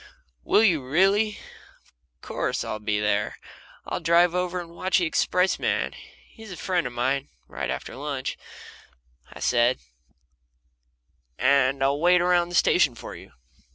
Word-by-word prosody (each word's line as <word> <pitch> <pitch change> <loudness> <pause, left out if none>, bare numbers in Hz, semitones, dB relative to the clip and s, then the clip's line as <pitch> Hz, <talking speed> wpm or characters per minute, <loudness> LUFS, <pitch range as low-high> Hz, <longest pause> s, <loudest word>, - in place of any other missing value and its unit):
"Will 215 - +3
you, 170 -10 +3
really? 195 +9 +2 0.8
Of 65 - -49
course, - - -2
I'll 110 - -5
be 105 0 -1
there. 105 0 -1 0.5
I'll - - -3
drive 170 +1 +3
over 180 -1 -2
with 170 +3 -6
the 180 - +1
expressman 180 +3 0 0.3
he's 220 -3 -13
a 180 - -7
friend 180 -6 -1
of 125 - -9
mine 130 +3 -1 0.2
right - - -5
after - - -5
lunch," 140 -1 -4 1.0
I - - -11
said, 120 +1 +2 1.6
"and 135 0 +2
I'll 140 +1 +1
wait 180 +2 +4
around 175 -1 +2
the 175 - -5
station 155 -7 +3
for - - -9
you." - - -14
165 Hz, 140 wpm, -25 LUFS, 130-180 Hz, 1.6 s, wait